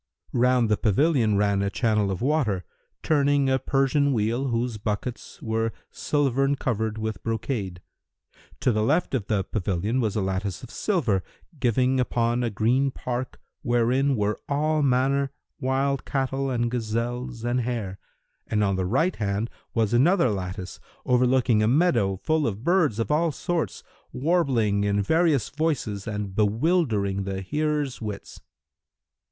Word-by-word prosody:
Round 125 -1 +3
the 105 -1 +2
pavilion 115 - +2
ran 100 -1 +2
a 100 - 0
channel 105 -2 +1
of 95 +4 -3
water, 125 - +1 0.4
turning 145 -2 +2
a 130 - +2
Persian 135 +2 +2
wheel[FN#317] 115 +5 0
whose 120 -1 -1
buckets[FN#318] 105 +3 -4
were 115 0 0 0.2
silvern 135 -1 +1
covered 110 -5 -2
with 110 -3 -4
brocade. 110 -6 -3 0.8
To 125 - +3
the 110 -1 0
left 145 +11 +1
of 120 -7 -1
the 105 -3 +1
pavilion[FN#319] 100 +4 -1
was 110 -3 -1
a 105 - +1
lattice 95 +1 -2
of 125 - -10
silver, 130 - 0 0.4
giving 130 +2 +2
upon 120 -1 +1
a 120 - 0
green 120 +6 +2
park, 125 -1 -5 0.2
wherein 125 +2 +2
were 105 -1 -1
all 155 +2 +1
manner 135 +1 +1 0.3
wild 135 +1 0
cattle 135 0 -1
and 120 -2 0
gazelles 120 +1 -3
and 120 +1 +1
hares, 115 -6 -3 0.5
and 105 -1 +1
on 100 -2 +1
the 95 -1 -1
right 160 - +1
hand 105 +2 -2 0.2
was 115 -1 +1
another 155 - +4
lattice, 95 -1 -5 0.3
overlooking 125 -2 +3
a 110 - +3
meadow 130 - +3
full 155 - 0
of 105 0 -4
birds 170 - +2
of 115 +5 -1
all 160 +2 +2
sorts, 175 +2 -3 0.3
warbling 125 - +1
in 100 0 +1
various 160 - +2
voices 140 -10 -2
and 105 -3 -4
bewildering 110 - +1
the 95 0 -4
hearers' 150 +3 -1
wits. 105 -2 -7
120 Hz, 145 wpm, -25 LUFS, 105-135 Hz, 0.8 s, another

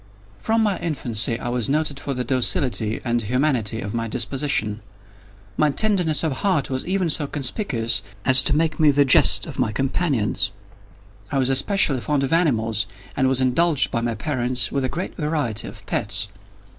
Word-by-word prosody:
From 225 0 0
my 205 -3 0
infancy 120 -7 +1
I 120 - -4
was 120 0 -1
noted 150 -1 -1
for 140 -2 -4
the 125 - -2
docility 125 -4 0
and 120 -1 0
humanity 115 -2 -1
of 100 +1 -6
my 115 -1 -2
disposition. 115 -2 -1 0.8
My 150 - +3
tenderness 180 -2 +2
of 160 - 0
heart 180 -10 -1
was 130 0 -2
even 190 -1 0
so 150 -2 0
conspicuous 130 - -1 0.2
as 130 0 +8
to 145 - +1
make 160 0 0
me 155 -2 +5
the 145 0 +3
jest 130 - +5
of - - -9
my - - 0
companions. 135 - 0 0.8
I 140 - -1
was 130 0 +1
especially 135 - +1
fond 145 0 -1
of 135 - -1
animals, 115 - +1 0.3
and 130 - +1
was 130 0 +2
indulged 145 +4 +2
by 115 - -1
my 115 -1 -2
parents 125 -4 -1
with 140 - -1
a 130 - -1
great 175 +3 -5
variety 150 - -2
of - - -12
pets. 105 0 0
135 Hz, 175 wpm, -21 LUFS, 115-155 Hz, 0.8 s, as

